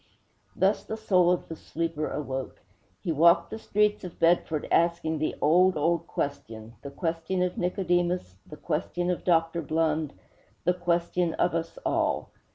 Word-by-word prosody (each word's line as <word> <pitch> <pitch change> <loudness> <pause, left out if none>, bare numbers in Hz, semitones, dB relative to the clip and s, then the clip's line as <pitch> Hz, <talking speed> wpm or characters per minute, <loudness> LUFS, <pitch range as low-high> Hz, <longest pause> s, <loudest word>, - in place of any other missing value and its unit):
Thus 195 +2 +2
the 220 - -5
soul 185 -5 +3
of 180 - -1
the 165 - -6
sleeper 165 -1 -3
awoke. 135 -2 -4 0.4
He 170 - -1
walked 170 +3 +4
the 220 - -5
streets 210 -1 +1
of 180 -2 -8
Bedford 165 -2 +2
asking 170 -2 +2
the 155 - -1
old, 180 +3 +4
old 170 +2 +1
question, 115 -5 -5
the 140 - -7
question 170 +4 -2
of 180 0 -1
Nicodemus, 175 - 0
the 150 - -10
question 175 +4 -2
of 180 - -3
Dr. 165 -1 +2
Blund, 155 -1 0 0.5
the 180 - +3
question 175 -1 0
of - - +1
us 165 0 -3
all. - - 0
170 Hz, 155 wpm, -27 LUFS, 155-180 Hz, 0.5 s, walked